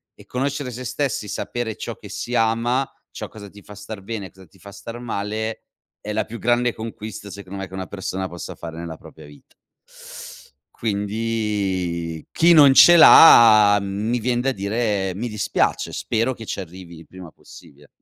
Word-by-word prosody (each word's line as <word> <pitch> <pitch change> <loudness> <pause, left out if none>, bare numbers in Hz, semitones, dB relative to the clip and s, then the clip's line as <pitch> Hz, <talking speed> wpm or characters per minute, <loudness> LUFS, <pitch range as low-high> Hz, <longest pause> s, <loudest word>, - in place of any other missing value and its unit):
e - - -17
conoscere 135 +1 -3
se 125 +2 -7
stessi 130 -4 -3
sapere 115 +2 -4
ciò - - -6
che - - -13
si 120 - -6
ama, 120 +4 +1 0.2
ciò - - -7
cosa 100 -2 -12
ti 105 +1 -15
fa 105 - -13
star 105 0 -9
bene, 100 -2 -6
cosa 95 0 -17
ti 95 - -24
fa 100 +3 -12
star 115 +4 -9
male, 110 -1 -4 0.4
è 105 - -7
la 110 - -1
più 115 +1 -8
grande 120 0 +1
conquista, 110 -2 -8
secondo 100 0 -9
me, 95 - -5
che 95 - -18
una 95 0 -5
persona 95 -1 -5
possa 85 - -8
fare 80 -1 -9
nella 85 -1 -7
propria - - -15
vita. 75 0 -18 1.2
Quindi 100 -6 -3
chi 170 +1 +4
non 145 -4 +7
ce 175 +5 +8
l'ha, 110 -10 +8
mhmm, 100 +2 -4
mi 120 - 0
vien 120 +1 -1
da 135 +2 0
dire: 100 -2 -2
"Mi 115 +6 -5
dispiace, 105 -1 -1
spero 115 +4 -1
che 115 - -11
ci - - -4
arrivi 90 -1 -11
il 80 - -14
prima 90 -2 -12
possibile". 75 +1 -17
105 Hz, 180 wpm, -21 LUFS, 95-120 Hz, 1.2 s, ce